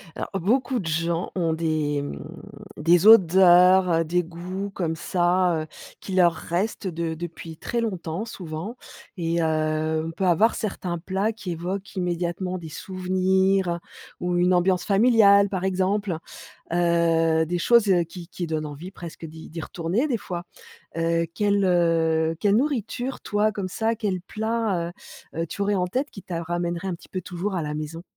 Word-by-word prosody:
Alors, -, -, -4 dB
beaucoup 245 Hz, +7 st, +1 dB
de 185 Hz, -, -6 dB
gens 165 Hz, +2 st, -1 dB
ont 170 Hz, -3 st, +1 dB
des, 155 Hz, -3 st, 0 dB
mmh, 105 Hz, -, -6 dB, 0.6 s
des 170 Hz, +5 st, +4 dB
odeurs, 180 Hz, -3 st, +6 dB
des 175 Hz, +2 st, +1 dB
goûts 180 Hz, +4 st, -6 dB
comme 165 Hz, -4 st, -2 dB
ça, 175 Hz, 0 st, +1 dB
heu, -, -, -10 dB, 0.3 s
qui 190 Hz, -, -7 dB
leur 175 Hz, -2 st, +5 dB
restent 190 Hz, +5 st, -3 dB
de 165 Hz, -2 st, -2 dB
depuis 165 Hz, -1 st, -8 dB
très 235 Hz, +7 st, -2 dB
longtemps, 185 Hz, -3 st, -3 dB
souvent 185 Hz, +2 st, -6 dB, 0.4 s
et 170 Hz, 0 st, 0 dB
heu, 155 Hz, 0 st, 0 dB
on 165 Hz, -, -4 dB
peut 190 Hz, +3 st, -2 dB
avoir 185 Hz, +6 st, +4 dB
certains 185 Hz, -4 st, -3 dB
plats 190 Hz, +5 st, -1 dB
qui 210 Hz, -5 st, -6 dB
évoquent 185 Hz, +4 st, -5 dB
immédiatement 180 Hz, 0 st, -2 dB
des 165 Hz, -3 st, -8 dB
souvenirs, 185 Hz, 0 st, 0 dB, 0.4 s
ou 180 Hz, 0 st, -1 dB
une 180 Hz, +1 st, +3 dB
ambiance 180 Hz, 0 st, +2 dB
familiale, 200 Hz, -2 st, +5 dB
par 190 Hz, -2 st, -3 dB
exemple, 190 Hz, 0 st, 0 dB, 0.6 s
heu, 165 Hz, -2 st, +3 dB
des 175 Hz, +2 st, -2 dB
choses 230 Hz, +1 st, +4 dB, 0.2 s
qui 175 Hz, -1 st, -9 dB
qui 175 Hz, -1 st, -5 dB
donnent 155 Hz, -1 st, -2 dB
envie 150 Hz, +5 st, -8 dB
presque 170 Hz, -3 st, -9 dB
d'y 160 Hz, 0 st, -10 dB
d'y 165 Hz, 0 st, -6 dB
retourner 180 Hz, -, -1 dB
des 250 Hz, -5 st, 0 dB
fois. 175 Hz, -4 st, -6 dB, 0.5 s
Heu, 165 Hz, 0 st, +1 dB
quelle, 205 Hz, 0 st, +2 dB
heu, 165 Hz, -2 st, +2 dB
quelle 205 Hz, +2 st, +3 dB
nourriture, 255 Hz, -1 st, -2 dB
toi, 210 Hz, +1 st, +1 dB
comme 195 Hz, -2 st, -4 dB
ça, 225 Hz, +4 st, 0 dB
quel 200 Hz, -5 st, -2 dB
plat, 215 Hz, -4 st, -2 dB, 0.4 s
heu, -, -, -4 dB
heu, -, -, 0 dB
tu 200 Hz, -, -6 dB
aurais 205 Hz, +1 st, +1 dB
en 180 Hz, -1 st, 0 dB
tête 260 Hz, +10 st, -2 dB
qui 195 Hz, -, -11 dB
t'a 170 Hz, -2 st, -4 dB
ramènerait 175 Hz, +2 st, -2 dB
un 180 Hz, -, -2 dB
petit -, -, -18 dB
peu 185 Hz, -, -4 dB
toujours 180 Hz, +3 st, -4 dB
à 175 Hz, -, -1 dB
la 150 Hz, -1 st, -3 dB
maison? 155 Hz, +2 st, -5 dB
180 Hz, 170 wpm, -24 LUFS, 165-195 Hz, 0.6 s, odeurs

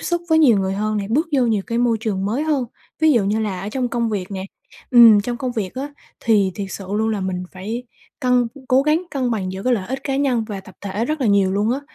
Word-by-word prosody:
xúc 345 Hz, 0 st, -1 dB
với 320 Hz, -1 st, +4 dB
nhiều 250 Hz, -10 st, +5 dB
người 190 Hz, 0 st, -1 dB
hơn 215 Hz, +1 st, -1 dB
nè, 200 Hz, -, -2 dB
bước 290 Hz, +10 st, +1 dB
vô 270 Hz, -, +3 dB
nhiều 215 Hz, -4 st, +1 dB
cái 230 Hz, -, -1 dB
môi 240 Hz, -2 st, +2 dB
trường 205 Hz, -4 st, -2 dB
mới 225 Hz, +9 st, -1 dB
hơn, 295 Hz, -5 st, 0 dB, 0.4 s
ví 315 Hz, -1 st, +5 dB
dụ 230 Hz, -5 st, +3 dB
như 210 Hz, +3 st, 0 dB
là 200 Hz, -4 st, -2 dB
ở 200 Hz, -, -5 dB
trong 250 Hz, +2 st, -2 dB
công 235 Hz, -1 st, -1 dB
việc 195 Hz, -2 st, -3 dB
nè. 190 Hz, -1 st, -4 dB, 0.5 s
Ừm, 230 Hz, -4 st, +8 dB
trong 240 Hz, +4 st, -3 dB
công 250 Hz, +1 st, -3 dB
việc 210 Hz, -6 st, -3 dB
á, 280 Hz, +3 st, -5 dB, 0.3 s
thì 205 Hz, -4 st, +2 dB
thiệt 200 Hz, -, -4 dB
sự 195 Hz, -, -6 dB
luôn 220 Hz, +1 st, +1 dB
là 215 Hz, -2 st, -1 dB
mình 185 Hz, -1 st, -3 dB
phải 215 Hz, +6 st, -5 dB, 0.4 s
cân 250 Hz, -1 st, +3 dB, 0.2 s
cố 260 Hz, +1 st, +4 dB
gắng 305 Hz, +4 st, +2 dB
cân 265 Hz, -5 st, -1 dB
bằng 190 Hz, -5 st, -2 dB
giữa 190 Hz, +1 st, -6 dB
cái 250 Hz, +2 st, +2 dB
lợi 195 Hz, -5 st, -1 dB
ích 265 Hz, +2 st, -2 dB
cá 270 Hz, -1 st, -1 dB
nhân 255 Hz, -5 st, +1 dB
và 205 Hz, -3 st, -6 dB
tập 190 Hz, -1 st, -15 dB
thể 205 Hz, +3 st, -3 dB
rất 305 Hz, +3 st, -2 dB
là 255 Hz, -, +1 dB
nhiều 200 Hz, -2 st, +3 dB
luôn 205 Hz, +3 st, +1 dB
á. 270 Hz, -, -2 dB
225 Hz, 270 wpm, -20 LUFS, 200-255 Hz, 0.5 s, Ừm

